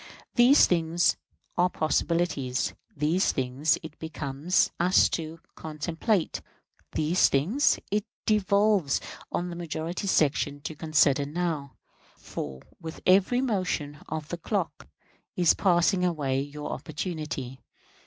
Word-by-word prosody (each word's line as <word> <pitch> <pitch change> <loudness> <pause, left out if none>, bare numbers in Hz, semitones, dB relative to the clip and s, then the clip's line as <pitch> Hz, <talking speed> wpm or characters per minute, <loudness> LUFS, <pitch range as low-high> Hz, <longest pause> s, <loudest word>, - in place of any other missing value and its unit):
These 250 +4 +7
things 170 0 +2 0.4
are 180 +1 +4
possibilities; 155 -6 0 0.2
these 160 +6 +2
things 135 +3 0
it 160 -1 -10
becomes 160 +1 0
us 180 +2 +5
to 165 0 -4
contemplate; 160 +5 -2 0.5
these 160 +4 +3
things 190 - +2
it 210 0 0 0.2
devolves 200 -6 +2 0.3
on 175 0 -2
the - - -6
majority 170 +3 -4
section 145 -4 +1
to 155 - -5
consider 150 -3 +2
now; 155 -3 -3 0.4
for 65 -2 -7 0.2
with 160 -2 -8
every 195 +7 +4
motion 180 - -2
of 155 -1 -4
that 175 -1 -5
clock - - -3 0.5
is 175 -3 +4
passing 180 0 +2
away 145 -7 0
your 145 +1 -6
opportunity. 150 -3 -5
160 Hz, 115 wpm, -27 LUFS, 145-180 Hz, 0.5 s, These